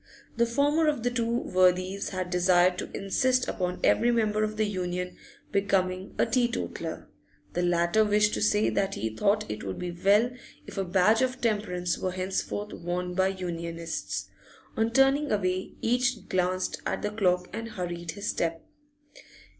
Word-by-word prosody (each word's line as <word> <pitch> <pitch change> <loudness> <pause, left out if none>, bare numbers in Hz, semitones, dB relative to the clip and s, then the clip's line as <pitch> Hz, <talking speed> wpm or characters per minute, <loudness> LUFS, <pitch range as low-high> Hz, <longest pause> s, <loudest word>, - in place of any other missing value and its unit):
The 235 0 +2
former 290 +6 +2
of 290 -6 0
the 245 - +1
two 235 -1 -1
worthies 185 -3 +1
had 185 -2 -4
desired 180 0 +3
to - - -5
insist 255 +6 +1
upon 180 -1 -2
every 240 - +4
member 215 -2 +2
of 215 0 -2
the 215 - +2
Union 180 -2 -3 0.4
becoming 190 -1 0
a - - +3
teetotaller; 245 -2 -2 0.5
the 175 - 0
latter 175 +4 +3
wished 210 0 +3
to - - -1
say 210 0 +3
that 195 0 0
he 110 -1 -3
thought 210 - +2
it 105 0 -5
would 95 -1 -4
be 180 -1 -4
well 200 +7 +3 0.3
if - - -6
a - - +1
badge 190 +5 +3
of 260 0 0
temperance 205 -7 -1
were 185 - -2
henceforth 190 +2 -3
worn 180 +1 -3
by 190 +1 +2
Unionists. 170 -3 -4 0.5
On 225 +1 +1
turning 270 +4 +3
away, 185 -2 -1
each 245 -2 +1
glanced 185 0 -1
at - - -2
the 210 - -1
clock 180 -4 +1
and 230 0 -5
hurried 175 -4 -5
his 200 - -6
step. 165 -1 -1
195 Hz, 160 wpm, -28 LUFS, 180-225 Hz, 0.5 s, every